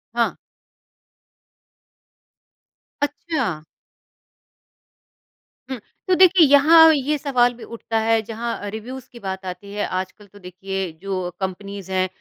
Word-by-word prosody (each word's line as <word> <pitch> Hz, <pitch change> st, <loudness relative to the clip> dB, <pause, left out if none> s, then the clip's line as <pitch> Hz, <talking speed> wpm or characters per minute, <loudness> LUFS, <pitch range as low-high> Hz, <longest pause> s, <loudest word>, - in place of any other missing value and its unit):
हाँ। -, -, +1 dB, 2.7 s
अच्छा। 280 Hz, -, -2 dB, 2.1 s
हुँ। 260 Hz, -3 st, -4 dB, 0.3 s
तो 370 Hz, -, +4 dB
देखिए, 370 Hz, -2 st, +7 dB
यहाँ 320 Hz, +3 st, +7 dB
ये 295 Hz, +1 st, 0 dB
सवाल 250 Hz, -4 st, +2 dB
भी 240 Hz, -, -13 dB
उठता 230 Hz, -1 st, -4 dB
है 225 Hz, 0 st, +2 dB
जहाँ 225 Hz, -1 st, -5 dB
रिव्युज़ 245 Hz, +4 st, -8 dB
की 240 Hz, -, -12 dB
बात 190 Hz, -2 st, -5 dB
आती 200 Hz, +2 st, -7 dB
है। 205 Hz, -, -1 dB
आजकल 190 Hz, +3 st, -5 dB
तो 205 Hz, +1 st, -17 dB
देखिए 190 Hz, 0 st, -5 dB
जो 185 Hz, -2 st, -3 dB
कम्पनीज़ 195 Hz, 0 st, -6 dB
हैं 185 Hz, 0 st, +1 dB
220 Hz, 115 wpm, -22 LUFS, 190-270 Hz, 2.7 s, देखिए